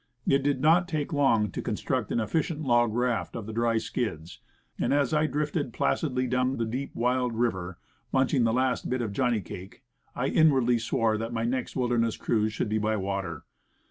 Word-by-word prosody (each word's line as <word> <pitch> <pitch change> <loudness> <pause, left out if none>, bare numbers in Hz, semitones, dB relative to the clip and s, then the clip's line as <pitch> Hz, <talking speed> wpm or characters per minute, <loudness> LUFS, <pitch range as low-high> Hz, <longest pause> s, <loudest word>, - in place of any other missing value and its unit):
It 140 0 +3
did 140 -1 0
not 170 +4 +4
take 155 -4 -2
long 115 -8 +3
to - - -4
construct - - -2
an - - +1
efficient 155 - -1
dog 120 -2 +3
raft 120 +1 -1
from 115 -3 -5
the 110 - -6
dry 115 0 +1
skids, 90 -9 -4 0.4
and - - 0
as 145 -1 +1
I 155 0 +3
drifted 145 -4 -2
placidly 130 -1 0
down 125 +1 0
the 115 - 0
deep, 130 +5 -4
wild 125 0 0
river, 95 -7 -1 0.3
munching 130 -1 +2
the 115 - +3
last 130 +2 0
bit 125 -1 -1
of 105 -3 -4
johnny 120 -1 +1
cake, 95 +1 -10 0.3
I - - -1
inwardly 130 -7 +3
swore 115 -1 0
that 115 +1 -4
my 115 -1 -1
next 125 +1 -2
wilderness 120 -3 +1
cruise 110 -2 0
should 105 - -2
be 110 +1 0
by 110 +1 0
water. 95 -5 -3
120 Hz, 190 wpm, -27 LUFS, 110-135 Hz, 0.4 s, not